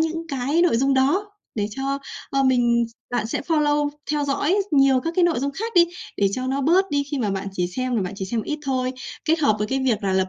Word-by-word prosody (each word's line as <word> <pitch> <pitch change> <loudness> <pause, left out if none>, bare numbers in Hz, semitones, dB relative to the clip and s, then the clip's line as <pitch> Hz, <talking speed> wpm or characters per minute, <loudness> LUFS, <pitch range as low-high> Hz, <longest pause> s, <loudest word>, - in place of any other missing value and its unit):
những 330 +1 -1
cái 280 +5 +1
nội 340 -10 +3
dung 270 +2 +2
đó 340 +11 +2 0.2
để 205 -2 -1
cho, 275 +4 -2 0.3
ơ, 275 0 +1
mình 240 -2 +3 0.3
bạn 240 -3 -1
sẽ - - -2
follow 295 -1 +1 0.2
theo 295 -1 0
dõi 285 +5 +1 0.2
nhiều 275 -3 +4
các 330 +5 -3
cái 365 - +4
nội 340 -5 +2
dung 280 +1 -1
khác 450 +9 -4
đi, 345 -1 +7 0.3
để 200 -1 +3
cho 255 +3 -2
nó 270 +1 -1
bớt 365 +7 +3
đi 285 0 +1
khi 285 - -2
mà 215 -5 0
bạn 195 0 -3
chỉ 180 -2 -1
xem 250 +7 -2
là 205 - +1
bạn 185 +2 -4
chỉ 195 - -4
xem 220 +3 -2
ít 300 +6 -3
thôi. 255 -2 -1 0.3
Kết 320 +2 +2
hợp 215 -9 +3
với 210 - -1
cái 270 +4 -1
việc 230 -4 +1
là 190 - +1
lập 190 0 +1
270 Hz, 255 wpm, -23 LUFS, 235-300 Hz, 0.3 s, đi